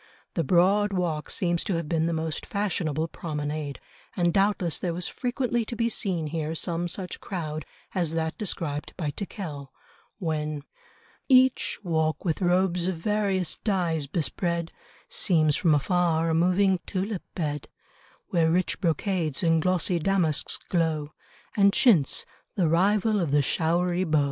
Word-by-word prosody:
The 165 - 0
Broad 195 +6 +3
Walk 170 -5 -1
seems 175 -2 +1
to 190 - 0
have 165 -2 -2
been 165 0 +1
the - - 0
most 160 -1 -3
fashionable 170 -6 -1
promenade, 150 -3 -4 0.4
and 175 -2 +2
doubtless 195 -4 +2
there 175 -2 -2
was 175 +1 -1
frequently 245 -2 -1
to 235 - -6
be 230 0 +1
seen 185 -7 0
here 160 +1 -3
some 170 +1 -1
such 180 +1 -3
crowd 155 -5 -4 0.3
as 170 -3 0
that 160 -1 -1
described 165 -9 -3
by 155 -5 -2
Tickell, 155 -7 -6 0.5
when 155 -5 -2 0.7
"Each 260 -1 +4
walk 160 -3 0
with 165 +2 0
robes 180 0 +2
of 185 -3 -1
various 195 -1 0
dyes 170 -8 0
bespread 170 +2 -2 0.4
Seems 155 -5 +2
from 160 -4 +3
afar 165 +1 +1
a - - +1
moving 185 +3 +3
tulip 195 +1 -2
bed, 150 -4 -3 0.6
Where 165 -2 +3
rich 180 +2 0
brocades 170 -3 0
and 165 -1 +3
glossy 180 0 +1
damasks 170 -4 +1
glow, 160 -4 0 0.4
And 200 -1 +5
chintz, 185 - +4 0.3
the 180 -5 +2
rival 205 +6 +3
of 170 -5 0
the 145 0 +3
showery 175 +5 +1
bow." 155 -2 +2
170 Hz, 145 wpm, -26 LUFS, 160-190 Hz, 0.7 s, And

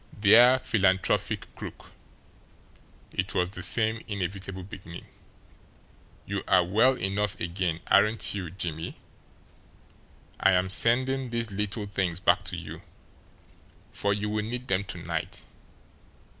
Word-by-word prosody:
"Dear 120 +5 +7
Philanthropic 95 -6 0
Crook" - - -10 1.2
it 95 0 -2
was 90 0 +1
the 95 - -7
same 110 +4 +1
inevitable 95 -2 -4
beginning. 90 -2 -10 1.2
"You 100 0 -3
are 95 -2 +5
well 110 +9 +3
enough 100 -1 -2
again, 85 -1 -2
aren't 105 +2 +3
you, 95 -4 -4
Jimmie? 80 -2 -5 1.4
I 95 - +4
am 90 +1 +1
sending 130 - +2
these 115 -2 -2
little 105 +2 -2
things 95 -4 -2
back 95 - +3
to - - -3
you, - - -8 1.1
for 100 - -1
you 105 +1 -1
will 105 0 -1
need 125 +3 -5
them 95 +1 +1
to - - -6
night." - - -5
100 Hz, 120 wpm, -27 LUFS, 95-110 Hz, 1.4 s, Dear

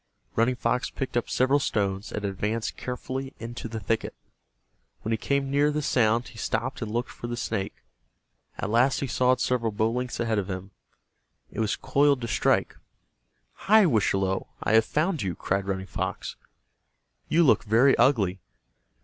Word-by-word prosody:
Running 115 +3 +2
Fox 125 +1 0
picked 135 - -5
up 120 - 0
several 130 +3 +3
stones, 100 -5 -1
and 105 - -3
advanced 105 +3 -2
carefully 130 +2 -5
into 115 0 -6
the 110 0 -5
thicket. 110 +2 -2 0.9
When 110 - -2
he 115 - +2
came 140 -1 0
near 145 +1 +3
the 150 0 -1
sound 120 -2 +2
he 115 - -12
stopped 115 +4 -2
and 110 - -3
looked 120 +3 -2
for 120 - -7
the 120 0 -4
snake. 110 -5 -3 0.8
At 100 - -3
last 125 +4 +3
he - - 0
saw 125 0 +2
it - - -3
several 115 -3 0
bow 110 +2 +1
lengths 125 +1 -3
ahead 115 -3 +1
of 100 -1 -4
him. 95 +1 -5 0.8
It - - -7
was 110 -2 +1
coiled 140 -2 +2
to 115 - -3
strike. - - +1 0.9
"Hi, 215 0 +7
Wischalowe, 95 - +1 0.2
I - - 0
have 110 0 +6
found 160 +1 0
you," 95 -3 -2
cried 95 +1 -1
Running 95 -1 -2
Fox. - - -4 0.9
"You 170 +2 +4
look 145 - +4
very 120 +5 +4
ugly. 110 -8 +3
115 Hz, 170 wpm, -26 LUFS, 105-130 Hz, 0.9 s, Hi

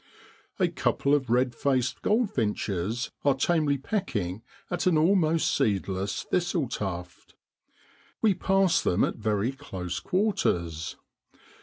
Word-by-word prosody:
A - - +3
couple 140 - 0
of 135 -4 +1
red 125 +1 +2
faced 130 -2 0
goldfinches 115 - 0
are 140 -2 +4
tamely 150 0 +2
pecking 120 - -2 0.3
at 175 - 0
an 175 -4 +4
almost 165 -1 +3
seedless 100 -5 -1
thistle 175 -5 0
tuft. 90 -5 -6 0.8
We 215 -3 +4
pass 190 -1 +2
them 90 - +2
at - - -1
very 110 +1 0
close 95 -9 -5
quarters. 90 - -1
130 Hz, 115 wpm, -27 LUFS, -, 0.8 s, are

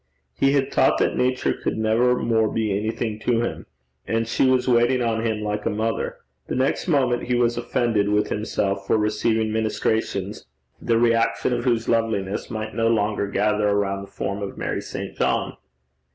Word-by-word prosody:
He 135 - +2
had 140 -2 +1
thought - - +4
that - - +1
Nature 130 0 +1
could - - -3
never 115 +3 +2
more 110 -3 +1
be 110 -3 0
anything 110 +1 -2
to 115 +1 +1
him; 120 - -4 0.4
and 115 0 0
she 115 - +2
was 130 -1 +2
waiting 120 +1 +3
on 115 -1 0
him 110 -2 -1
like 105 0 -2
a - - +2
mother. 110 +2 -2 0.3
The - - -3
next 130 +7 0
moment 130 -7 +1
he 125 - 0
was 120 -1 +2
offended 115 -4 0
with 105 0 +1
himself 100 -2 -2
for - - +3
receiving 110 +1 0
ministrations 110 -2 -1 0.3
the 115 - +1
reaction 115 +1 +2
of 120 +1 -2
whose 120 -2 +1
loveliness 110 -4 -1
might 110 -1 -5
no 115 0 +1
longer 105 -2 +1
gather 105 +1 +1
around 100 -1 0
the 100 - -9
form 100 +1 -4
of 100 - -5
Mary - - -2
St. - - -6
John. - - 0
110 Hz, 180 wpm, -23 LUFS, 105-120 Hz, 0.4 s, thought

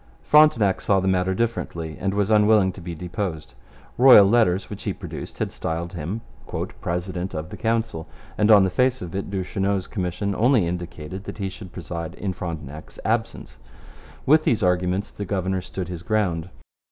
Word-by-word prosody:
Frontenac 150 -11 +5
saw 100 -1 +3
the 95 - -1
matter 95 0 +1
differently 85 -8 -2
and 95 +1 -1
was 100 +1 +1
unwilling 105 -2 +5
to 90 - -12
be 85 0 -6
deposed. 90 -1 -5 0.5
Royal 125 -6 +9
letters, 100 -3 +3
which 105 - -8
he - - -1
produced, - - -8
had - - -2
styled 85 +2 -4
him 90 +6 -4 0.6
'President 90 +1 -3
of 80 +3 -5
the - - -6
Council,' 115 -7 -1 0.3
and 105 0 +2
on 105 -3 +8
the 95 - +1
face 130 +1 +1
of 85 - -7
it 100 +1 -3
Duchesneau's 95 0 -1
commission 95 +1 -2
only 115 -1 +3
indicated 85 +1 -5
that - - -7
he 100 -2 -2
should 95 -1 -10
preside 85 -2 -6
in 95 -2 -3
Frontenac's 80 -5 -7
absence. - - -2 0.7
With 155 +3 +5
these 110 -7 +1
arguments 90 +2 +1
the 105 - -6
governor 95 -1 -1
stood 90 0 -6
his 90 -2 -6
ground. 90 -5 -1
95 Hz, 170 wpm, -23 LUFS, 90-105 Hz, 0.7 s, Royal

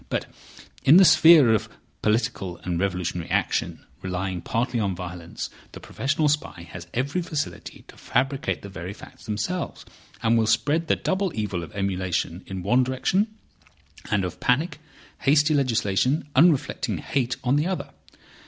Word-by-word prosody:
But - - -1 0.6
in 150 +6 +8
the 190 - +8
sphere 160 -9 +7
of 110 - 0 0.3
political 110 -5 0
and 90 -2 -2
revolutionary 90 -3 -2
action, - - -1 0.2
relying 90 -1 -3
partly 120 +4 -1
on 100 -4 0
violence, 85 -1 -7 0.2
the - - -8
professional 150 +3 -1
spy 145 - -2
has 90 0 -9
every 140 +9 -1
facility 155 -4 -5
to - - -15
fabricate 135 +2 -1
the - - -7
very 95 0 -7
facts - - -14
themselves, 110 +13 -3 0.4
and 115 0 +3
will 110 - +1
spread 160 +7 +1
the - - +3
double 190 -1 -1
evil 105 -5 -2
of 85 - -9
emulation 95 -2 -2
in 95 -2 -5
one 125 +7 +3
direction, 130 - +1 0.8
and 100 -3 +1
of 90 - -6
panic, 150 +6 +1 0.4
hasty 150 +2 +3
legislation, 130 +1 +1
unreflecting 150 0 +3
hate, 130 -2 -1
on 125 +2 +2
the 150 +4 +1
other. 190 -1 -3
115 Hz, 150 wpm, -24 LUFS, 95-145 Hz, 0.8 s, in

